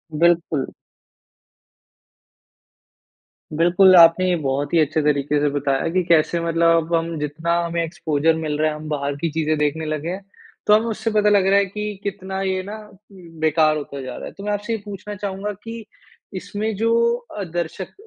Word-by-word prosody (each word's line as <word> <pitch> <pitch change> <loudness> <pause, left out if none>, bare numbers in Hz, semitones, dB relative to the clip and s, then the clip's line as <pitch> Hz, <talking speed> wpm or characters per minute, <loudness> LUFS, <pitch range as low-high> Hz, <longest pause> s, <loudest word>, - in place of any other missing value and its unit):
बिल्कुल। 165 -3 +2 2.9
बिल्कुल। 180 +3 +5
आपने 170 +2 +7
ये 180 - +2
बहुत 140 -1 -2
ही 170 - +4
अच्छे 155 0 +1
तरीके 145 0 +1
से 145 - +2
बताया 140 +1 -1
कि 185 +1 +1
कैसे 170 0 +2
मतलब 165 0 +3
अब 165 +1 -2
हम 165 0 -2
जितना 155 +3 -2
हमें 170 0 -1
एक्सपोज़र 160 -2 0
मिल 155 -2 -3
रहा 155 0 +2
है, 155 - -4
हम 155 0 -8
बाहर 145 -1 -2
की 165 - 0
चीज़ें 155 0 0
देखने 150 +2 -1
लगे 155 +1 -3
हैं। 190 +3 -5 0.4
तो 210 - +6
हमें 215 +2 +4
उससे 225 0 -2
पता 210 -1 +3
लग 200 -2 +4
रहा 195 +1 +5
हैं 200 -1 0
कि 210 0 -5
कितना 190 -1 -4
ये 190 -1 -1
ना 205 +3 -7 0.3
बेकार 160 -4 0
होता 140 -2 -6
जा 130 -1 -7
रहा - - -7
है। - - -7
तो 200 - -9
मैं 210 - -2
आपसे 205 +3 -3
ये 225 - -2
पूछना 205 0 -7
चाहूँगा 200 +1 -4
कि 230 -1 -8 0.5
इसमें 205 +3 -3
जो 225 +3 0 0.6
दर्शक 175 +2 -4
170 Hz, 180 wpm, -21 LUFS, 155-195 Hz, 2.9 s, आपने